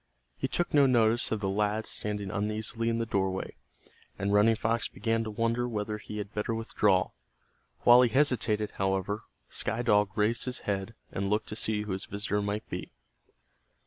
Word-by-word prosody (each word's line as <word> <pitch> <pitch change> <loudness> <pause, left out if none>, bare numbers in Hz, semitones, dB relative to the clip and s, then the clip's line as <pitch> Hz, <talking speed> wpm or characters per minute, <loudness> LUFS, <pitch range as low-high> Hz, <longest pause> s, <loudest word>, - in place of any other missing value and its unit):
He - - -2
took 175 - 0
no 145 -2 +6
notice 120 -1 +3
of 110 - -1
the 100 - 0
lad 105 +2 0
standing 105 -2 -3
uneasily 110 +3 -1
in 115 - 0
the 115 - -1
doorway, 95 -3 -1 0.6
and 100 +1 -1
Running 105 +2 +5
Fox 115 +1 0
began 115 +2 -1
to - - -4
wonder 115 +3 0
whether 105 -1 -3
he 105 0 -8
had 105 0 -5
better 105 +2 -1
withdraw. 105 -4 +1 0.7
While 120 +1 +8
he 125 - +4
hesitated, 115 -6 +2
however, 95 +2 -1 0.2
Sky 115 +2 -2
Dog 105 -3 +3
raised 110 +3 +1
his 125 0 -4
head 100 +2 -3 0.2
and 100 0 -2
looked 105 +1 0
to - - -4
see 105 -1 0
who 105 - -5
his 95 0 -2
visitor 105 +1 -1
might 105 +1 -3
be. - - -6
105 Hz, 175 wpm, -29 LUFS, 105-115 Hz, 0.7 s, While